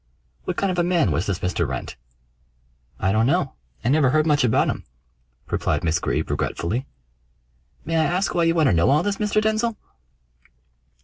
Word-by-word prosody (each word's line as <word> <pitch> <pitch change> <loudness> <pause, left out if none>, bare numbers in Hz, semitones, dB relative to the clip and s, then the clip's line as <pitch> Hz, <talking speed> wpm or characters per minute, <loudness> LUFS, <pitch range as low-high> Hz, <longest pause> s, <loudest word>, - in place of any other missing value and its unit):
"What - - -3
kind 195 -1 +1
of 180 - -2
a - - +3
man 170 - +2
was 80 +4 -1
this 95 -3 -2
Mr. 90 - -1
Wrent?" - - -5 1.0
"I 95 - +1
don't 110 +3 +2
know. 150 -2 +1 0.3
I - - +2
never 140 -1 +4
heard 155 +3 +2
much 150 -3 +3
about 120 - +3
him," - - -3 0.7
replied - - 0
Miss 85 +1 +1
Greeb - - -2
regretfully. 115 +11 -2 1.0
"May 165 +2 0
I 160 - +3
ask 180 +5 0
why 170 -1 +2
you 165 0 +2
want 160 -2 +3
to 110 - +4
know 85 +7 +3
all 150 +4 +3
this, 205 -1 -1
Mr. 210 0 +1
Denzil?" 220 +1 0
155 Hz, 185 wpm, -23 LUFS, 110-180 Hz, 1.0 s, never